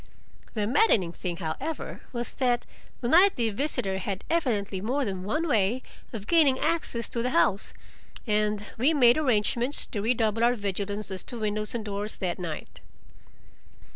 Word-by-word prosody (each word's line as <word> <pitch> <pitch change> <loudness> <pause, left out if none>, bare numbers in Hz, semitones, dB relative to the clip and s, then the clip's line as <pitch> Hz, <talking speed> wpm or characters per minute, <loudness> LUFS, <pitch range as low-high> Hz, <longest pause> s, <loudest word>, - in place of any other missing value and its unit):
The 210 -2 0
maddening 225 - +3
thing, 175 0 -5
however, 175 - -4
was 240 -1 -4
that 245 -2 0 0.4
the 235 - -1
nightly 320 - +4
visitor 225 -6 0
had 195 0 -4
evidently 210 - 0
more 260 +6 0
than 190 -3 -4
one 305 - -1
way 230 -1 +1 0.3
of 215 -4 -6
gaining 300 -4 +4
access 310 -8 -1
to 235 - -2
the 250 - 0
house, 190 -1 +2 0.5
and 210 -1 0
we 295 +7 +4
made 245 0 +6
arrangements 245 0 +1
to 205 - -4
redouble 225 0 +1
our 240 +1 +4
vigilance 205 0 -2
as 190 - -2
to 240 - -5
windows 215 +1 -1
and 225 -2 -3
doors 205 +1 -4
that 180 -3 -2
night. 165 -4 -6
220 Hz, 155 wpm, -27 LUFS, 200-255 Hz, 0.5 s, made